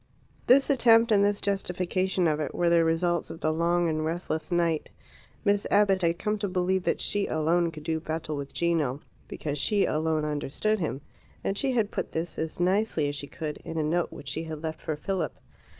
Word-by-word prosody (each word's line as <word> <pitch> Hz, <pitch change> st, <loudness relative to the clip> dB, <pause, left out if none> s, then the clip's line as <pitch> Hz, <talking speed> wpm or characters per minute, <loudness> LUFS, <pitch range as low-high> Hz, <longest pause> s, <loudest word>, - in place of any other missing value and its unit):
This 275 Hz, +4 st, +6 dB
attempt, 230 Hz, -3 st, +5 dB
and 200 Hz, -1 st, +5 dB
this 205 Hz, 0 st, +2 dB
justification 185 Hz, -1 st, 0 dB
of 155 Hz, -1 st, +1 dB
it, 155 Hz, -, -3 dB
were 175 Hz, -1 st, +2 dB
the 170 Hz, -1 st, +5 dB
results 170 Hz, +1 st, +1 dB
of 165 Hz, -, -8 dB
the 155 Hz, -, 0 dB
long 170 Hz, +1 st, +2 dB
and 155 Hz, -1 st, -1 dB
restless 160 Hz, 0 st, -3 dB
night. 170 Hz, -3 st, +1 dB, 0.6 s
Miss 200 Hz, 0 st, +2 dB
Abbott 200 Hz, -2 st, +4 dB
had 170 Hz, 0 st, +1 dB
come 210 Hz, +2 st, -1 dB
to 200 Hz, -, -1 dB
believe 185 Hz, 0 st, +1 dB
that -, -, +1 dB
she 205 Hz, -1 st, 0 dB
alone 165 Hz, +2 st, +1 dB
could 155 Hz, -2 st, -10 dB
do 160 Hz, 0 st, -1 dB
battle 155 Hz, -1 st, -4 dB
with 140 Hz, -1 st, -5 dB
Gino, 155 Hz, -5 st, 0 dB, 0.3 s
because 150 Hz, -1 st, -4 dB
she 205 Hz, +6 st, +2 dB
alone 155 Hz, 0 st, 0 dB
understood 150 Hz, +8 st, -1 dB
him; 150 Hz, -5 st, -3 dB, 0.4 s
and 195 Hz, -, -1 dB
she 265 Hz, +5 st, +1 dB
had 220 Hz, -4 st, +1 dB
put -, -, -4 dB
this, 165 Hz, 0 st, -3 dB
as 160 Hz, +1 st, -4 dB
nicely 180 Hz, -4 st, +1 dB
as 145 Hz, -, -4 dB
she 145 Hz, 0 st, -6 dB
could, 150 Hz, 0 st, -5 dB
in 165 Hz, -, -7 dB
a 155 Hz, -, +1 dB
note 170 Hz, +3 st, 0 dB
which 140 Hz, -, -8 dB
she 160 Hz, -, -3 dB
had 160 Hz, -1 st, -7 dB
left 160 Hz, 0 st, -4 dB
for 155 Hz, -, -2 dB
Philip. 170 Hz, 0 st, -3 dB
170 Hz, 205 wpm, -27 LUFS, 155-195 Hz, 0.6 s, This